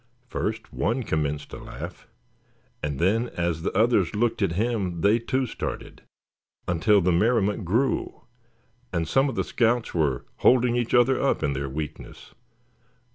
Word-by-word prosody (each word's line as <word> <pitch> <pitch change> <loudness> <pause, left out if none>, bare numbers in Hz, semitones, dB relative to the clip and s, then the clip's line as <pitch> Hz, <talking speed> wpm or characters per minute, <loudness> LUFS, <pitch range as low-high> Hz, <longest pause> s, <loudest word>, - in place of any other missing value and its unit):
First 110 +1 -3
one 120 +3 0
commenced 75 -5 -2
to - - -7
laugh, - - -9 0.7
and 75 -2 -3
then, 110 - +1
as 85 -2 -1
the 85 - -1
others 105 -5 +3
looked 115 +1 0
at 95 -4 +1
him 100 -4 -1
they 105 +3 +4
too 130 +3 -1
started, - - -6 0.7
until 95 +4 +3
the 90 +1 +2
merriment 105 +1 +2
grew, 115 +9 0 0.7
and 85 -2 -1
some 135 - +3
of 130 - -5
the - - 0
scouts 120 0 0
were 75 -7 0
holding 125 -1 +4
each 120 0 0
other 125 +2 +4
up - - +1
in 70 - +1
their 70 0 -3
weakness. 75 +2 -7
105 Hz, 150 wpm, -25 LUFS, 85-120 Hz, 0.7 s, they